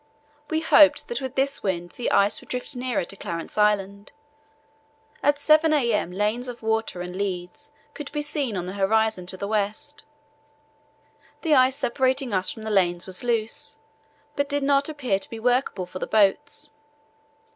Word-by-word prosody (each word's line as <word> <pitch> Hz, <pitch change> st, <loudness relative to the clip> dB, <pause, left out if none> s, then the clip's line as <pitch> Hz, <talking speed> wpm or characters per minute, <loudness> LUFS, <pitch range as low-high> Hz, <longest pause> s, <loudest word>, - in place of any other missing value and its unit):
We 315 Hz, 0 st, 0 dB
hoped 300 Hz, -2 st, +5 dB
that 475 Hz, -, -3 dB
with 260 Hz, -2 st, -5 dB
this 275 Hz, +1 st, 0 dB
wind 175 Hz, -3 st, -2 dB
the 245 Hz, -, -3 dB
ice 200 Hz, +1 st, +3 dB
would -, -, -18 dB
drift 250 Hz, 0 st, -3 dB
nearer 245 Hz, -6 st, -1 dB
to 195 Hz, -, -8 dB
Clarence 170 Hz, -3 st, -5 dB
Island. 200 Hz, -1 st, +1 dB, 1.1 s
At 290 Hz, +1 st, +3 dB
7 310 Hz, +2 st, +4 dB
a.m. 235 Hz, -, +1 dB
lanes 210 Hz, +6 st, -1 dB
of 240 Hz, -2 st, -8 dB
water 220 Hz, -4 st, -1 dB
and 180 Hz, 0 st, -6 dB
leads 190 Hz, +8 st, -4 dB, 0.2 s
could 295 Hz, -2 st, -7 dB
be 295 Hz, 0 st, -2 dB
seen 285 Hz, -8 st, -2 dB
on 175 Hz, -, -3 dB
the 185 Hz, -, -5 dB
horizon 200 Hz, -1 st, +1 dB
to 185 Hz, -, -4 dB
the 200 Hz, -, -4 dB
west. 215 Hz, +8 st, -2 dB, 1.4 s
The 320 Hz, -3 st, +3 dB
ice 260 Hz, -1 st, +5 dB
separating 260 Hz, -1 st, 0 dB
us 185 Hz, -1 st, +1 dB
from 220 Hz, -, -7 dB
the 220 Hz, -, -3 dB
lanes 175 Hz, -3 st, +2 dB
was 185 Hz, +2 st, -4 dB
loose, 230 Hz, -2 st, -1 dB, 0.6 s
but 285 Hz, 0 st, -1 dB
did 285 Hz, -1 st, -1 dB
not 280 Hz, +1 st, +2 dB
appear 255 Hz, -10 st, -1 dB
to -, -, -7 dB
be 225 Hz, -, -7 dB
workable 245 Hz, -5 st, +1 dB
for 180 Hz, +1 st, -8 dB
the -, -, -3 dB
boats. 220 Hz, +7 st, +1 dB
225 Hz, 170 wpm, -25 LUFS, 195-275 Hz, 1.4 s, hoped